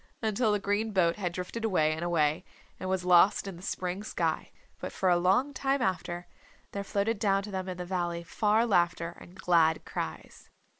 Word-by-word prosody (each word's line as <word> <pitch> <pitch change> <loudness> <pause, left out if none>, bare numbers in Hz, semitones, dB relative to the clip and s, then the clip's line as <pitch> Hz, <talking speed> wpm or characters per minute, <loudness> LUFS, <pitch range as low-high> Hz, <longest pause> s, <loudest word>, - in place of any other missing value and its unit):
until 220 +1 +2
the 210 - +2
green 205 +2 -1
boat 170 -3 +3
had 180 -4 -2
drifted 180 +6 -5
away 170 -8 +2
and 160 +2 -4
away 165 -1 +1 0.4
and 185 - -4
was 190 -1 -1
lost 180 +4 +5
in 195 -2 -6
the 170 - -12
spring 185 +1 -3
sky. - - -2 0.3
But - - -5
for 190 - 0
a 175 - +5
long 195 +11 +2
time 275 +1 0
after, 180 -6 -2 0.5
there 200 - -4
floated 200 +2 -1
down 195 -2 +2
to 205 - -7
them 190 -1 -3
in 180 - -5
the 180 - -5
valley 175 -2 -2
far 215 +6 +2
laughter 175 -4 +1
and 175 - -14
glad 170 -4 +2
cries. - - -6
185 Hz, 195 wpm, -29 LUFS, 175-205 Hz, 0.5 s, lost